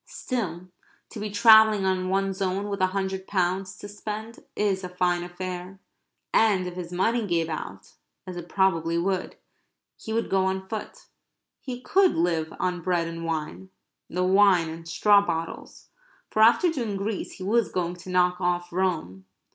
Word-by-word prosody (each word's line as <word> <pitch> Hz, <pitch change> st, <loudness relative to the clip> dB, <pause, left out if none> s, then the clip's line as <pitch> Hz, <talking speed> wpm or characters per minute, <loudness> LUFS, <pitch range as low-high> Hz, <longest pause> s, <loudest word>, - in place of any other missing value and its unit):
Still, 205 Hz, -, -4 dB, 0.4 s
to 220 Hz, -, -7 dB
be 210 Hz, 0 st, -3 dB
travelling 220 Hz, -1 st, +6 dB
on 185 Hz, -1 st, 0 dB
one's 195 Hz, 0 st, -1 dB
own 195 Hz, +2 st, -1 dB
with 200 Hz, -1 st, -3 dB
a 185 Hz, -, +4 dB
hundred 190 Hz, 0 st, -3 dB
pounds 185 Hz, 0 st, -1 dB
to 205 Hz, -, -9 dB
spend 215 Hz, +2 st, -7 dB
is 195 Hz, -2 st, 0 dB
a 180 Hz, -, -5 dB
fine 180 Hz, -1 st, 0 dB
affair. 180 Hz, +1 st, -6 dB, 0.5 s
And 205 Hz, -5 st, +3 dB
if 180 Hz, -, -5 dB
his 175 Hz, -1 st, -7 dB
money 220 Hz, +5 st, 0 dB
gave 165 Hz, -2 st, 0 dB
out, 155 Hz, -, -7 dB, 0.3 s
as 185 Hz, -, -7 dB
it 175 Hz, 0 st, -8 dB
probably 170 Hz, -4 st, +1 dB
would, 185 Hz, +2 st, -1 dB, 0.6 s
he 220 Hz, -, -8 dB
would 230 Hz, +1 st, 0 dB
go 190 Hz, -1 st, +2 dB
on 190 Hz, 0 st, -2 dB
foot. 220 Hz, -, -7 dB, 0.5 s
He 250 Hz, -2 st, -7 dB
could 380 Hz, +7 st, +3 dB
live 165 Hz, -2 st, 0 dB
on 180 Hz, -1 st, -1 dB
bread 175 Hz, -2 st, 0 dB
and 165 Hz, 0 st, -6 dB
wine 165 Hz, +3 st, -4 dB, 0.4 s
the 180 Hz, +1 st, -1 dB
wine 185 Hz, -3 st, +4 dB
in 165 Hz, +1 st, -9 dB
straw 200 Hz, +4 st, +4 dB
bottles 165 Hz, -3 st, -5 dB, 0.4 s
for 215 Hz, -, +1 dB
after 240 Hz, +10 st, +5 dB
doing 235 Hz, -10 st, -3 dB
Greece 200 Hz, +1 st, -3 dB
he 185 Hz, -, -9 dB
was 225 Hz, +4 st, +1 dB
going 175 Hz, -1 st, -1 dB
to 180 Hz, +1 st, -11 dB
knock 180 Hz, 0 st, +2 dB
off 175 Hz, -1 st, -1 dB
Rome. 160 Hz, -, -2 dB
185 Hz, 170 wpm, -26 LUFS, 175-205 Hz, 0.6 s, travelling